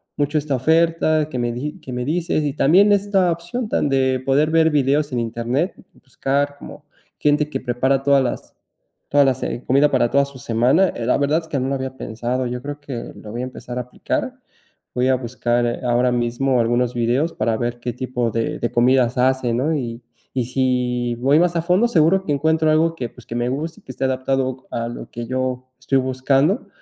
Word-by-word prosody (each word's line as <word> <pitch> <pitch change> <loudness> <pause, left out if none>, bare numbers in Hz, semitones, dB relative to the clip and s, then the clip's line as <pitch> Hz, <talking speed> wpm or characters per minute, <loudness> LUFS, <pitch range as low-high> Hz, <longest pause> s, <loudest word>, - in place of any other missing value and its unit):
mucho 145 +1 0
esta 145 -1 -1
oferta 160 +2 +2
que 130 - -4
me 120 0 0
di 145 +9 -5
que 130 - -9
me 125 0 -3
dices, 160 +1 0
y 145 -2 -1
también 185 +9 +5
esta 195 -3 +2
opción 170 +9 -4
de - - -8
tan 145 - +1
de 130 -1 +2
poder 145 +3 +2
ver 160 0 +4
videos 145 0 +1
en 125 - -1
internet. 120 - -1 0.2
Y - - -21
buscar 140 +2 -2
como 150 - -11 0.3
gente 150 0 +2
que 135 - -3
prepara 130 +2 0
todas 140 -1 +4
las 125 - -4 0.6
todas 145 0 +4
las, 130 -1 0
eh, 120 - -4
comida 140 +3 +4
para 125 -3 +2
toda 140 0 +3
su 140 -1 -12
semana, 125 +9 +2
eh, 115 - -5
la 125 - +2
verdad 145 +3 +2
es 160 - -14
que 140 - -2
no 130 - -1
lo 140 - 0
había 130 0 -4
pensado. 120 +3 -3
Yo 125 0 -4
creo 145 +1 -6
que 135 -5 -7
lo 105 - -10
voy 120 +2 -4
a - - -2
empezar 125 -1 -8
a - - 0
aplicar. 125 - -3 0.6
Voy 125 +1 +2
a 130 - +4
buscar 120 -1 -1
ahora 125 +1 +2
mismo 120 +2 0
algunos 120 +1 +1
videos 120 +7 +1
para 115 - 0
ver 120 +1 -3
qué 120 0 -4
tipo 125 -1 -2
de 115 +1 -2
de 120 - -2
comidas 125 0 +3
hace, 130 -1 +2
¿no?, 135 +7 0
y 120 -4 -4 0.3
y 125 -2 -1
si 125 -1 0
voy 135 +6 +3
más 175 0 +2
a 165 - +1
fondo, 185 +7 +3
seguro 185 -1 +3
que 150 - 0
encuentro 160 +2 +2
algo 165 +1 +3
que, 120 -7 -4
pues, 125 - -16
que 115 - -7
me 120 0 0
guste, 155 +5 -4
que - - -10
esté 135 - -5
adaptado 130 0 -1
a 115 0 -2
lo 120 - -8
que 120 0 -6
yo 130 0 -2
estoy 135 +1 +1
buscando 135 - +1
130 Hz, 215 wpm, -21 LUFS, 125-150 Hz, 0.6 s, también